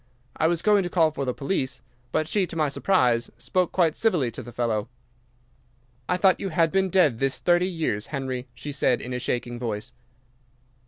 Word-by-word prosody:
I 160 Hz, -, +2 dB
was 170 Hz, 0 st, 0 dB
going 210 Hz, -1 st, +5 dB
to 180 Hz, -, -3 dB
call 165 Hz, -3 st, +3 dB
for 140 Hz, -2 st, -3 dB
the 125 Hz, -, 0 dB
police, 135 Hz, -2 st, -2 dB, 0.3 s
but 155 Hz, -, 0 dB
she, 190 Hz, +2 st, +1 dB
to -, -, -9 dB
my 155 Hz, -3 st, +1 dB
surprise, 125 Hz, -7 st, +2 dB
spoke 180 Hz, -2 st, 0 dB
quite 165 Hz, -4 st, +2 dB
civilly 170 Hz, -, +1 dB
to -, -, -7 dB
the 120 Hz, -, -10 dB
fellow. 115 Hz, -2 st, -1 dB, 1.2 s
"'"I 180 Hz, -, +2 dB
thought 185 Hz, 0 st, +4 dB
you 195 Hz, -, -3 dB
had 165 Hz, -1 st, +2 dB
been 190 Hz, 0 st, +2 dB
dead 165 Hz, -11 st, +3 dB
this 135 Hz, -1 st, 0 dB
thirty 175 Hz, +1 st, +2 dB
years, 155 Hz, -, -2 dB
Henry," 130 Hz, -3 st, -4 dB
said 135 Hz, -1 st, 0 dB
she, -, -, -6 dB
in 125 Hz, -, -5 dB
a 125 Hz, -, -2 dB
shaking 120 Hz, 0 st, -3 dB
voice. 115 Hz, 0 st, -4 dB
150 Hz, 195 wpm, -25 LUFS, 125-180 Hz, 1.2 s, going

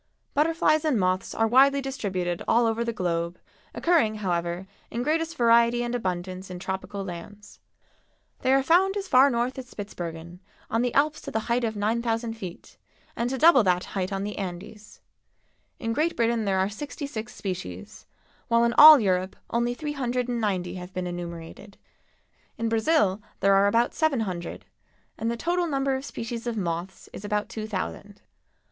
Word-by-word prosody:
Butterflies 310 Hz, 0 st, +2 dB
and 295 Hz, -8 st, +1 dB
moths 185 Hz, 0 st, 0 dB
are 225 Hz, -, +2 dB
widely 270 Hz, +4 st, +5 dB
distributed 195 Hz, -10 st, -3 dB
all 235 Hz, +1 st, +4 dB
over 225 Hz, +1 st, 0 dB
the 235 Hz, -, -2 dB
globe, 170 Hz, -4 st, -2 dB, 0.4 s
occurring, 320 Hz, -11 st, +2 dB
however, 175 Hz, -2 st, -2 dB, 0.2 s
in 235 Hz, +1 st, -3 dB
greatest 325 Hz, +3 st, -1 dB
variety 235 Hz, 0 st, +4 dB
and 240 Hz, 0 st, -3 dB
abundance 185 Hz, -4 st, -3 dB
in 180 Hz, -, -6 dB
tropical 190 Hz, +2 st, -5 dB
lands. 195 Hz, +4 st, -10 dB, 0.8 s
They 260 Hz, -, +1 dB
are 270 Hz, 0 st, +4 dB
found 380 Hz, +6 st, +3 dB
as 395 Hz, -1 st, -4 dB
far 260 Hz, +2 st, +6 dB
north 245 Hz, +1 st, -1 dB
as 250 Hz, -1 st, -9 dB
Spitzbergen, 175 Hz, -5 st, -7 dB, 0.3 s
on 225 Hz, -, +2 dB
the 245 Hz, 0 st, 0 dB
Alps 300 Hz, +2 st, +2 dB
to -, -, -7 dB
the 220 Hz, -, -1 dB
height 240 Hz, +2 st, 0 dB
of 220 Hz, -2 st, -1 dB
9,000 225 Hz, +2 st, -1 dB
feet, 185 Hz, -6 st, -9 dB, 0.4 s
and 235 Hz, +1 st, -1 dB
to 265 Hz, -, -2 dB
double 310 Hz, -2 st, +7 dB
that 180 Hz, -3 st, +1 dB
height 190 Hz, -1 st, -2 dB
on 195 Hz, 0 st, -2 dB
the 210 Hz, +1 st, -5 dB
Andes. 195 Hz, +3 st, -8 dB, 0.8 s
In 230 Hz, -2 st, -2 dB
Great 315 Hz, +7 st, 0 dB
Britain 230 Hz, -1 st, +1 dB
there 195 Hz, -1 st, +1 dB
are 190 Hz, 0 st, +2 dB
sixty 285 Hz, +8 st, -6 dB
six 225 Hz, -6 st, -6 dB
species, 95 Hz, -, -6 dB, 0.4 s
while 230 Hz, 0 st, +3 dB
in 235 Hz, 0 st, +2 dB
all 305 Hz, -1 st, +11 dB
Europe 185 Hz, -3 st, 0 dB, 0.2 s
only 240 Hz, +1 st, 0 dB
three 295 Hz, +2 st, -4 dB
hundred 250 Hz, -3 st, -1 dB
and 240 Hz, -1 st, -2 dB
ninety 185 Hz, -4 st, -1 dB
have 180 Hz, +1 st, -9 dB
been 185 Hz, 0 st, -2 dB
enumerated. 175 Hz, +3 st, -7 dB, 0.8 s
In 230 Hz, 0 st, -1 dB
Brazil 220 Hz, -, +2 dB, 0.2 s
there 195 Hz, 0 st, +4 dB
are 195 Hz, +1 st, +5 dB
about 230 Hz, +4 st, +2 dB
seven 310 Hz, -7 st, +1 dB
hundred, 180 Hz, -5 st, -5 dB, 0.5 s
and 225 Hz, +1 st, -1 dB
the 235 Hz, -, -2 dB
total 345 Hz, +6 st, 0 dB
number 275 Hz, -2 st, 0 dB
of 265 Hz, +1 st, -3 dB
species 230 Hz, -2 st, -6 dB
of 235 Hz, -2 st, -2 dB
moths 175 Hz, -1 st, -4 dB
is -, -, -8 dB
about 210 Hz, 0 st, -2 dB
two 215 Hz, -1 st, -5 dB
thousand. 205 Hz, 0 st, -5 dB
225 Hz, 175 wpm, -26 LUFS, 190-250 Hz, 0.8 s, all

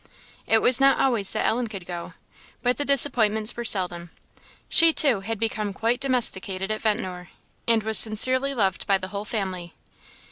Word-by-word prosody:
It 225 Hz, -, +2 dB
was 250 Hz, +1 st, +4 dB
not 275 Hz, 0 st, +3 dB
always 230 Hz, -7 st, 0 dB
that 215 Hz, -, -2 dB
Ellen 240 Hz, +1 st, -1 dB
could 195 Hz, -5 st, -9 dB
go, 175 Hz, -1 st, -8 dB, 0.5 s
but 245 Hz, 0 st, 0 dB
the 290 Hz, -, -2 dB
disappointments 235 Hz, -6 st, 0 dB
were 240 Hz, -, -5 dB
seldom; 180 Hz, -5 st, 0 dB, 0.6 s
she, 330 Hz, -1 st, +5 dB
too, 275 Hz, -9 st, +4 dB
had 220 Hz, +2 st, -6 dB
become 215 Hz, -2 st, -3 dB
quite 230 Hz, +5 st, -1 dB
domesticated 200 Hz, -7 st, -1 dB
at 215 Hz, -, -3 dB
Ventnor, 185 Hz, -6 st, -3 dB, 0.4 s
and 230 Hz, -2 st, +2 dB
was 220 Hz, 0 st, +5 dB
sincerely 255 Hz, +5 st, +3 dB
loved 195 Hz, -5 st, -2 dB
by 195 Hz, -, +3 dB
the 185 Hz, 0 st, -8 dB
whole 200 Hz, +1 st, -6 dB
family. 185 Hz, -6 st, -5 dB
220 Hz, 170 wpm, -23 LUFS, 195-245 Hz, 0.6 s, she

